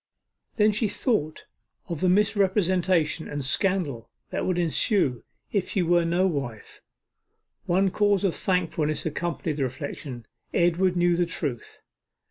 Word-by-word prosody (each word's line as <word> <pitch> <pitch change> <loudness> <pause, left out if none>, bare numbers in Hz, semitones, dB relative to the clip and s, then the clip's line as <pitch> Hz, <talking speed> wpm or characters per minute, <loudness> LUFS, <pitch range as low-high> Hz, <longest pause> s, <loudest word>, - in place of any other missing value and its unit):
Then 215 -1 +4
she 215 +1 0
thought 155 - -1 0.4
of 170 -4 -4
the 185 - +3
misrepresentation 185 -5 +2
and 145 -2 -3
scandal 145 - 0 0.2
that - - -2
would 185 -1 0
ensue 170 - +1 0.3
if 200 -4 -1
she 190 - +1
were 175 0 +3
no 175 +3 +2
wife. 140 - -4 0.9
One 190 +2 +2
cause 205 -1 +2
for 195 - +3
thankfulness 165 -5 -1
accompanied 160 -1 -3
the 140 - 0
reflection; 130 -1 -6 0.3
Edward 175 +1 +2
knew 175 0 +3
the 175 0 +1
truth. 145 -7 -5
175 Hz, 130 wpm, -26 LUFS, 150-190 Hz, 0.9 s, Then